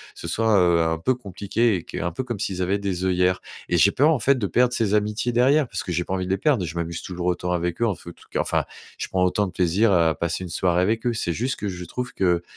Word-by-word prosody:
ce - - -7
soit, 110 +5 +2
heu, 85 -2 +4
un 80 0 0
peu 130 +9 +1
compliqué. 105 0 0
Et 85 - -4
q - - -5
un 85 +2 -1
peu 90 - -4
comme 120 -5 -5
s'ils 95 -2 -2
avaient 95 +2 +1
des 95 -2 -2
œillères. 90 0 +2 0.3
Et 90 - +2
j'ai 100 +4 +5
peur, 145 +8 +4
en 150 - +1
fait 140 +4 +3
de 105 - -1
perdre 125 +7 +2
ces 110 -4 0
amitiés 105 +3 0
derrière 130 +4 +3
parce - - -4
que 90 - -5
j'ai 90 +1 0
pas - - -4
envie 95 -1 -2
de - - -2
les 95 - +2
perdre, 125 - +1
je 80 0 -6
m'amuse 85 0 -3
toujours 90 -1 -5
autant 90 0 -1
avec 85 +2 -2
eux 115 - +3
en 100 - 0
fe - - -17
tout - - -21
cas - - 0
enfin, - - 0 0.3
je - - -3
prends 90 -1 +1
autant 100 +3 +1
de - - -7
plaisir 90 +5 +2
à 85 -2 +4
passer 85 +3 -2
une 90 - -6
soirée 90 0 +1
avec 110 +5 0
eux. 120 - +1
C'est 85 -6 -1
juste 125 +8 -1
que 105 - -2
je 90 -1 -6
trouve 125 +7 -5
qu'il 90 -2 +1
95 Hz, 290 wpm, -23 LUFS, 90-115 Hz, 0.3 s, j'ai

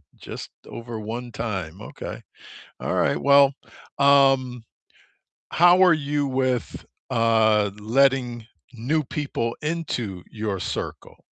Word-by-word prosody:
Just - - -9 0.2
over 115 -1 -7
1 120 +3 -6
time, 95 -7 -5
okay. - - -8 0.6
Alright, - - 0
well, 140 0 +6 0.5
um, 135 -4 +4 0.9
how 175 +2 +6
are 180 -2 +6
you 145 -2 -1
with, 130 -2 -2 0.2
uh, 110 -3 +3
letting 120 0 +1 0.3
new 140 +7 -1
people 135 -5 -3
into 125 - -3
your 105 -3 -3
circle? - - -6
125 Hz, 100 wpm, -23 LUFS, 110-140 Hz, 0.9 s, well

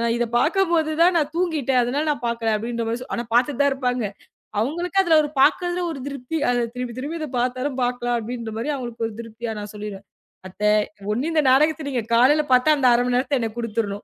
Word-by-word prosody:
இத 240 0 0
பாக்கும்போது 335 0 +2
தான் 355 +2 +6
நான் 300 -3 +1
தூங்கிட்டேன். 305 -8 +1
அதனால 270 +5 -1
நான் 280 - -4
பாக்கலை 230 -1 -1
அப்படின்ற 230 +1 -3
மாதிரி. 235 +2 -3
ஆனா 235 - -3
பாத்துட்டு 260 +2 +2
தான் 280 -1 +3
இருப்பாங்க. 250 -3 -1 0.6
அவங்களுக்கு 345 - -1
அதுல 335 -3 +4
ஒரு 295 - -3
பாக்குறதுல 355 +4 +2
ஒரு 280 - -6
திருப்தி. 280 +3 -4
அதைத் 240 -1 0
திரும்பித் 250 -1 -5
திரும்பிப் 310 +3 -4
பார்த்தாலும் 255 +2 -1
பாக்கலாம் 245 -1 -1
அப்படின்னு 230 0 -5 0.2
அவங்களுக்கு 240 -3 -4
ஒரு 225 - -9
திருப்தியா 230 0 -6
நான் 205 0 -7
சொல்லிடுவேன். 205 -2 -7 0.4
"அத்தை 210 +3 0 0.4
ஒன்னு 255 +9 -1
இந்த 310 - +4
நாடகத்தை 305 +3 +3
நீங்கக் 235 -4 -3
காலையில 280 +6 +5
பாத்தா, 255 +5 +5
அந்த 260 -3 +3
1/2 240 +1 +3
மணி 250 0 0
நேரத்தை 265 +2 0
எனக்குக் 230 0 -4
குடுத்துடணும், 210 -3 -3
250 Hz, 190 wpm, -22 LUFS, 235-295 Hz, 0.6 s, தான்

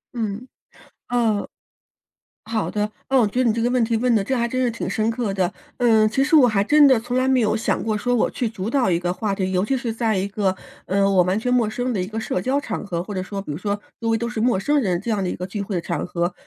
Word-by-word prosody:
嗯， 225 +1 -3 0.6
呃 230 -4 +1 1.0
好 225 -1 -2
的， 210 0 -2 0.2
那 270 - +3
我 240 - +5
觉 230 +5 0
得 255 - +2
你 225 - +3
这 230 - -1
个 240 - +2
问 250 -1 +2
题 230 0 0
问 245 +2 +2
得， 220 - +3
这 265 - -1
还 235 -1 +1
真 255 +1 -1
是 250 - +2
挺 230 - -4
深 220 0 0
刻 230 -3 -2
的。 185 -2 0 0.3
嗯， 220 -3 +4
其 265 - 0
实 300 - +3
我 290 -5 +8
还 215 -4 +2
真 295 +7 +5
的 255 -4 +5
从 245 +2 -4
来 255 - +2
没 265 -1 +3
有 215 -2 +2
想 225 - -1
过 220 -1 -1
说 245 +4 -1
我 245 - +2
去 240 -3 -2
主 205 -1 -4
导 245 -7 +2
一 170 - +2
个 175 0 -1
话 205 +1 -2
题， 190 -1 -1
尤 180 0 +2
其 270 +4 0
是 240 -3 -3
在 225 -3 0
一 190 - -1
个， 200 -1 0 0.3
呃， 195 +1 +2
我 185 -2 +4
完 185 +4 0
全 250 +3 -1
陌 235 -4 +2
生 245 +2 -2
的 195 - -1
一 180 - -2
个 220 +3 -5
社 185 - -2
交 265 +7 +1
场 225 -6 -5
合， 175 -4 -3
或 205 +4 -7
者 185 - -2
说 200 +1 -5
比 195 - -12
如 145 - -3
说， 205 +2 -3 0.2
周 230 - -1
围 225 - +2
都 235 - -3
是 235 -2 -3
陌 235 -4 +2
生 295 +9 +1
人 180 -5 0
这 225 - -6
样 205 -3 0
的 180 - -1
一 - - -3
个 180 - -5
聚 205 +1 -4
会 200 0 -4
的 175 - +1
场 170 -3 -3
合， 175 0 -2
220 Hz, 315 characters per minute, -22 LUFS, 195-245 Hz, 1.0 s, 我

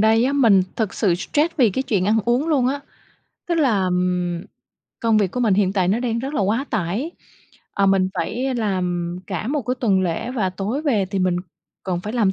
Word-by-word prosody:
đây 225 +2 +4
á, 275 - +1
mình 225 -9 +5
thực 220 -4 -1
sự 190 -5 +2
stress 300 - 0
vì 240 -7 +4
cái 260 +8 -1
chuyện 200 -8 0
ăn 220 +2 +3
uống 250 +7 +1
luôn 275 -6 +2
á. 280 +2 -1 0.7
Tức 340 - +1
là, 260 - +2
ừm, 180 -1 0 0.6
công 225 -2 +3
việc 195 -4 +1
của 250 - -3
mình 220 -5 +3
hiện 190 -1 +2
tại 185 -3 +1
nó 215 +5 +1
đang 235 -2 -1
rất 270 +4 -4
là - - 0
quá 215 +7 +1
tải, 215 - -1 0.6
ờ, 200 - +2
mình 195 -1 +3
phải 260 +2 -2
làm 180 -6 -1
cả 195 +1 -4
một 290 0 -1
cái 250 +2 -1
tuần 195 -6 +2
lễ, 175 +6 -2
và 215 -7 -1
tối 205 +10 -3
về 225 -11 +1
thì 195 +1 -3
mình 185 -1 +1 0.5
còn 180 -2 -2
phải 210 +4 -5
làm 220 -6 +2
210 Hz, 220 wpm, -21 LUFS, 185-250 Hz, 0.7 s, mình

